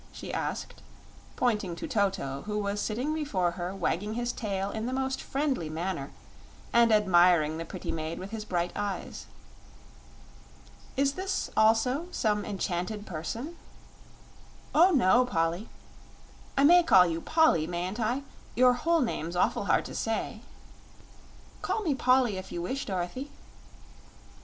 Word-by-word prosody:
she - - -8
asked, - - -4 0.5
pointing 210 -8 0
to 325 - -6
Toto, 195 - -1
who 210 0 -2
was 205 0 -1
sitting 250 +8 -1
before 205 - 0
her 175 +2 -5
wagging 205 +3 -1
his 240 0 -1
tail 200 -4 -3
in 220 +1 -3
the 255 - -3
most 265 0 -1
friendly 270 - -1
manner 160 -3 -3 0.6
and 235 -1 +5
admiring 175 -6 +4
the 165 - -4
pretty - - -5
maid 160 0 -4
with 190 +3 -7
his 220 -1 -4
bright 175 -4 -1
eyes. 205 -1 -4 1.7
"Is 275 0 +2
this, 380 +3 -3
also, 230 +8 +3
some 210 - 0
enchanted 195 +2 -3
person?" 225 - -5 1.2
"Oh 340 +5 +6
no, 250 - +4
Polly 170 -2 -1 0.9
I 275 - +4
may 350 +4 +8
call 190 - +6
you 165 -1 -2
Polly, 315 - +3
mayn't 180 +5 -3
I? 240 +5 0 0.3
Your 250 +1 +6
whole 330 +6 +1
name's 175 -8 -2
awful 175 - +1
hard - - +2
to - - -7
say." - - -2 1.2
"Call 440 - -1
me 320 -7 +1
Polly 255 -5 +3
if 185 0 -8
you 170 - -4
wish, 270 +9 -3
Dorothy." 190 +9 -3
210 Hz, 140 wpm, -28 LUFS, 175-260 Hz, 1.7 s, may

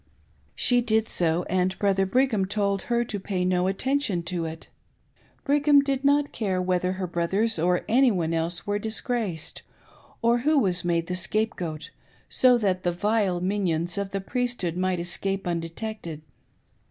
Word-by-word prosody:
She 245 -1 +3
did 220 -2 +1
so, 170 0 0
and 185 +1 0
Brother 195 -1 +2
Brigham 230 -2 +2
told 200 0 0
her 240 0 +2
to'^ay 195 -4 -2
no 180 0 +2
attention 215 -2 0
to 170 -1 -3
it. 160 0 -7 0.8
Brigham 290 0 +4
did 275 -1 -1
not 285 +1 +3
care 195 -5 -1
whether 180 0 0
her 190 0 -3
brothers 180 +5 0
or 180 +2 +1
any 260 +3 +5
one 170 -6 0
else 165 +2 -2
were 205 0 -1
disgraced, 220 - -3 0.6
or 235 +1 +4
who 300 +5 +2
was 185 -8 +1
made 170 -1 0
the 180 - -3
scapegoat, 185 -5 -2 0.4
so 250 -1 +5
that 190 -5 0
the 175 - 0
vile 195 -1 0
minions 175 -3 0
of 200 -1 -3
the 195 0 -3
Priesthood 240 -6 -2
might 185 0 0
escape 195 +2 -3
undetected. 170 -1 -5
190 Hz, 155 wpm, -26 LUFS, 175-225 Hz, 0.8 s, any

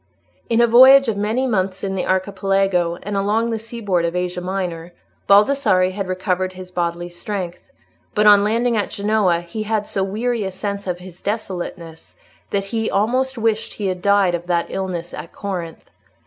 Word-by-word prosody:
In 230 0 +3
a - - +6
voyage 260 +3 +7
of 225 - 0
many 215 +6 0
months 195 -5 -1
in 195 -1 -2
the 190 - -2
Archipelago 190 -2 +1
and 205 0 -4
along 215 +4 +1
the 225 - -2
seaboard 215 -6 -2
of 170 +1 -1
Asia 180 0 -2
Minor, 180 -2 -4 0.3
Baldassarre 200 -3 +4
had 195 0 -4
recovered 185 0 -1
his 185 0 -10
bodily 175 -1 -2
strength, 175 0 -6 0.5
but 210 0 +3
on 205 -1 +7
landing 230 +3 +1
at 210 - 0
Genoa 200 -4 +1
he 175 +6 -6
had 215 -1 -1
so 195 -2 -2
weary 225 +4 -1
a 190 - -2
sense 200 +1 -5
of 180 -1 -2
his 180 0 -13
desolateness 180 -6 -5 0.3
that 200 -1 -1
he 225 -1 0
almost 255 +6 0
wished 225 -1 -1
he 200 -2 -2
had 180 -1 -4
died 200 -2 +3
of 175 0 -4
that 170 -1 +1
illness 180 -3 -4
at 170 - -8
Corinth. 180 -5 -6
195 Hz, 175 wpm, -20 LUFS, 180-215 Hz, 0.5 s, voyage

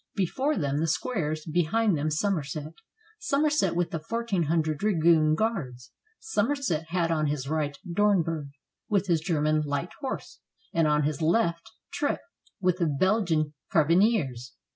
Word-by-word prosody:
Before 260 - 0
them, 145 -4 0
the 165 - 0
squares, 155 -4 -2
behind 175 +6 +1
them 150 +1 -1
Somerset; 155 -3 -2 0.5
Somerset 300 - +1
with 175 0 0
the 165 - -2
fourteen 210 0 -1
hundred 155 -1 0
dragoon 165 -6 +3
guards. 145 - -3 0.3
Somerset 245 - -1
had 170 0 0
on 155 -2 +1
his 145 -2 -2
right 150 -1 -1
Dornberg, 170 -6 +1 0.4
with 200 -2 +2
his 170 -4 +1
German 155 -2 +1
light 145 +3 -2
horse, 270 -2 -5 0.3
and 165 -2 +3
on 150 0 +2
his 150 +2 -1
left 170 +2 +1 0.2
Trip, 290 - -1 0.4
with 180 -1 +1
the 170 - +2
Belgian 160 -1 +1 0.2
carbi 165 -2 +4
neers. 145 - +1
165 Hz, 140 wpm, -27 LUFS, 155-205 Hz, 0.5 s, carbi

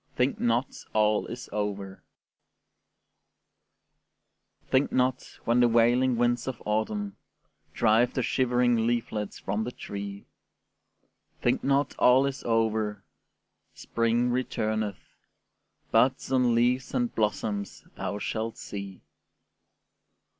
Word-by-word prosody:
THINK 125 +2 +1
NOT 120 +2 0
ALL 105 -1 +2
IS 125 +2 -7
OVER 100 -2 -3 2.7
Think 130 +2 +3
not, 130 0 0
when 120 +1 +3
the 120 - +6
wailing 120 +2 +3
winds 120 +1 +1
of 130 -3 -4
autumn 105 -1 -2 0.6
Drive 115 +2 +3
the 130 - 0
shivering 120 -3 +2
leaflets 110 -3 -2
from 105 +3 -2
the 120 - -4
tree, 100 -3 -7 1.2
Think - - +1
not 140 0 +1
all 130 +2 +6
is 135 -1 -3
over: 110 -3 0 0.7
spring 115 +1 0
returneth, 110 -5 -2 0.9
Buds 130 +1 +2
and 125 -3 +3
leaves 125 +2 +1
and 245 -2 0
blossoms 105 -1 -2
thou 100 - -3
shalt 110 +2 -3
see. 100 -2 -7
115 Hz, 105 wpm, -27 LUFS, 105-125 Hz, 2.7 s, the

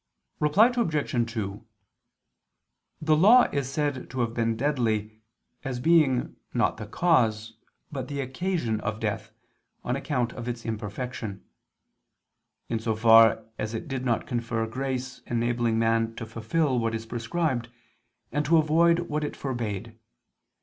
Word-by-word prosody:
Reply 205 +12 +4
Obj. 145 - 0
2: 105 -1 -4 1.4
The 155 0 +4
law 215 +10 +7
is 140 -3 -1
said 145 -3 -2
to 130 -1 -2
have 115 -1 -1
been 115 -1 0
deadly, 110 -6 -1 0.4
as 130 -3 -3
being 145 -3 +3 0.2
not - - +2
the 110 -2 -7
cause, 115 -7 +1 0.4
but 135 -4 -4
the 140 0 -4
occasion 135 - -1
of 105 +1 -3
death, 105 -3 -3 0.5
on 125 - -1
account 130 -4 -1
of 120 - -7
its 120 -1 -4
imperfection: 110 -1 -5 1.2
in 115 - -1
so 110 0 -1
far 115 0 +6
as 110 +1 -3
it 110 - -5
did 135 -3 -3
not 120 -3 0
confer 115 -2 -2
grace 130 +2 -4
enabling 120 -1 0
man 115 0 +1
to 115 - -6
fulfil 125 +5 0
what 115 -1 -1
is 110 0 -5
prescribed, 120 +2 -2 0.6
and 150 +1 0
to 165 +2 +5
avoid 165 +2 +4
what 155 -3 -3
it 145 - -3
forbade. 115 -4 -4
120 Hz, 140 wpm, -27 LUFS, 115-145 Hz, 1.4 s, law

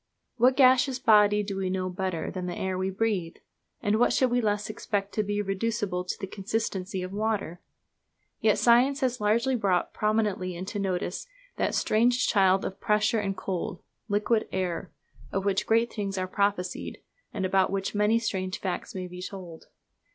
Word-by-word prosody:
What 255 +2 +4
gaseous 260 0 +5
body 210 -4 +5
do 200 -1 -4
we 190 -1 -1
know 185 0 -1
better 185 -2 -3
than 180 -1 -4
the 175 - -4
air 190 -1 -2
we 185 +1 -1
breathe? 195 -4 -1 0.5
and 205 +1 +2
what 245 - +4
should 255 -2 +2
we 245 0 +2
less 210 -1 0
expect 205 -2 -3
to 215 - +1
be 205 0 -1
reducible 195 -2 -1
to - - -3
the - - -3
consistency 195 -1 -3
of 185 +1 -6
water? 205 -5 -2 0.8
Yet - - +3
science 255 +4 +4
has 255 -3 0
lately 235 +5 +2
brought 195 -6 0
prominently 210 -4 0
into 190 +4 -5
notice 185 - -2 0.3
that - - 0
strange 240 +3 +2
child 195 -3 +3
of 190 - -5
pressure 215 +2 +2
and 195 -2 -2
cold, 180 -2 -4 0.3
Liquid 210 +2 +1
Air; 185 -2 -2 0.4
of 195 0 -2
which 195 -1 +1
great 230 +1 +2
things 200 -3 -3
are 185 0 -1
prophesied, 200 -1 -1 0.3
and 190 -2 -2
about 190 0 +2
which 195 0 -2
many 210 +2 +3
strange 190 -5 -2
facts 185 0 -4
may 185 -1 -3
be 180 0 -9
told. 180 -4 -8
200 Hz, 175 wpm, -27 LUFS, 185-220 Hz, 0.8 s, gaseous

